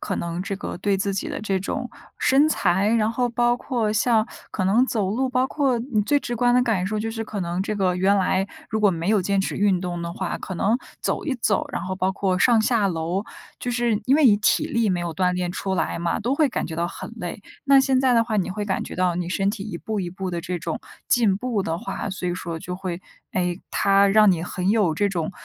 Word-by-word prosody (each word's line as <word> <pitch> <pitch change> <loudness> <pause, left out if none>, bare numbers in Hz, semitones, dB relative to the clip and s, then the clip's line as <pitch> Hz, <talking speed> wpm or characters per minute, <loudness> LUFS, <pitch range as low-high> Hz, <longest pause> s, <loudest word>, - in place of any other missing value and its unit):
可 - - -3
能 170 +1 -3
这 200 +1 -3
个 - - -5
对 200 +3 0
自 195 0 -1
己 195 - -2
的 - - -4
这 195 -3 0
种 245 +6 -4 0.3
身 275 +3 +4
材， 195 - +2
然 220 -1 +2
后 245 +2 0
包 240 0 +2
括 235 -5 -1
像 220 +1 +2 0.2
可 190 - -2
能 225 +7 +4
走 215 -7 -1
路， 255 +6 0
包 255 +1 +2
括 270 -4 +1
你 230 -3 0
最 285 +7 +2
直 240 -3 -4
观 245 +1 +3
的 250 - +5
感 205 -7 0
受 215 +1 -2
就 225 +1 -2
是 225 0 -4
可 210 -2 -5
能 175 +2 -2
这 215 - -2
个 185 -3 +1
原 195 +2 +3
来 190 +1 +1 0.2
如 220 - -1
果 205 -2 +4
没 170 +1 -3
有 210 -3 +3
坚 195 +1 +1
持 - - -2
运 195 -3 +2
动 175 -2 -4
的 170 0 -4
话， 190 0 -3
可 190 - -6
能 205 +6 +2 0.2
走 - - -2
一 285 -4 -1
走， 205 -4 +1
然 - - -2
后 185 +1 -4
包 190 0 0
括 190 -2 0
上 235 +1 +5
下 220 -2 +2
楼， 175 +3 -2 0.3
就 245 - -3
是 240 -3 +1
因 265 - +4
为 300 -2 +5
你 205 -4 +6
体 210 - +2
力 230 -4 +1
没 175 - 0
有 170 -2 -4
锻 180 -1 +1
炼 180 -1 -2
出 190 +1 -2
来 175 - -1
嘛， 170 +4 -1
都 245 +5 0
会 295 -2 +2
感 - - -2
觉 160 - -6
到 170 +1 0
很 - - -8
累。 180 -2 -6 0.2
那 275 -1 +6
现 265 -1 +2
在 260 -1 +3
的 230 - +5
话 220 -2 -2
你 190 -1 0
会 205 +3 -4
感 190 - -1
觉 - - -8
到 180 -1 +1
你 175 0 -2
身 195 +1 +1
体 200 -1 -3
一 205 -5 -6
步 215 +3 -3
一 175 -2 -4
步 185 +1 -5
的 175 - -3
这 180 0 -3
种 165 0 -4 0.3
进 220 -6 +3
步 220 -1 -1
的 165 -1 -2
话， 200 - -4
所 180 -1 -3
以 175 - -1
说 170 -2 -5
就 180 +2 -6
会， 180 -2 -5 0.3
诶， 180 0 -1
它 200 0 +4
让 210 0 +6
你 165 -2 -2
很 180 +1 -3
有 205 -6 +3
这 205 +5 +1
种， 170 -3 -2
200 Hz, 280 characters per minute, -23 LUFS, 180-230 Hz, 0.3 s, 你